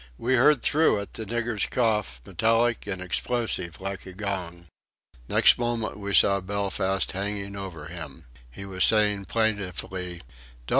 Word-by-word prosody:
We 125 +3 0
heard 130 +2 +4
through 155 -8 +4
it 100 - -9
the 110 - -6
nigger's 120 -1 -1
cough, 105 - 0
metallic 115 0 +1
and 95 -2 -3
explosive 90 -3 -2
like 95 0 -5
a 95 - -9
gong. 90 -4 -5 0.6
Next - - +5
moment 120 -2 -1
we 100 0 -4
saw 100 0 +5
Belfast 95 0 -1
hanging 100 +1 -4
over 95 -6 -7
him. 80 -4 -9 0.2
He 95 +11 -9
was 95 -1 0
saying 105 -2 +3
plaintively: 95 -5 -2 0.4
"Don't! - - -10
100 Hz, 145 wpm, -26 LUFS, 95-110 Hz, 0.6 s, Next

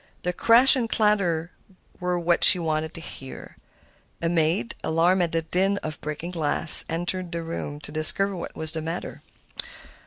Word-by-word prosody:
The 180 - -3
crash 235 +8 +4
and 240 -4 -3
clatter 180 -7 -1 0.5
were 180 0 -3
what 170 0 0
she 185 - +8
wanted 160 -2 -4
to 165 - -10
hear. 135 -5 -11 0.6
A 165 - -2
maid, 160 -7 -1
alarmed 170 +4 0
at 170 -2 -1
the 165 - -2
din 190 +4 -1
of 155 -1 -7
breaking 150 +3 -7
glass, 160 -1 +6
entered 175 +2 -4
the 170 -1 -5
room 155 -3 -7
to 145 - -10
discover 190 +6 +3
what 175 - -9
was 160 0 -2
the 160 - -6
matter. 165 +3 -7
170 Hz, 165 wpm, -23 LUFS, 160-180 Hz, 0.6 s, she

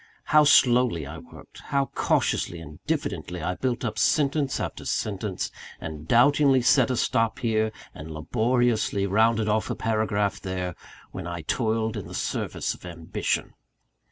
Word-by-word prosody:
How 150 0 +5
slowly 125 - +4
I 75 +3 -8
worked; - - -14
how 140 -2 0
cautiously 85 - 0
and 75 -2 -11
diffidently 90 0 -2
I 90 - 0
built 125 +4 -2
up 110 -1 -3
sentence 145 0 +2
after - - -4
sentence, - - -2 0.3
and 80 -1 -7
doubtingly 135 +1 +4
set 130 0 +4
a 125 - 0
stop 115 0 +1
here, 110 -2 0 0.2
and 75 +2 -9
laboriously 110 +5 +1
rounded 110 +2 +2
off 110 0 0
a - - -1
paragraph 110 -2 0
there, 90 -2 -3 0.4
when 90 -2 -6
I 85 -1 -5
toiled 110 0 0
in - - -6
the - - -8
service - - -2
of - - -15
ambition! 85 -2 -3
110 Hz, 150 wpm, -26 LUFS, 90-125 Hz, 0.4 s, How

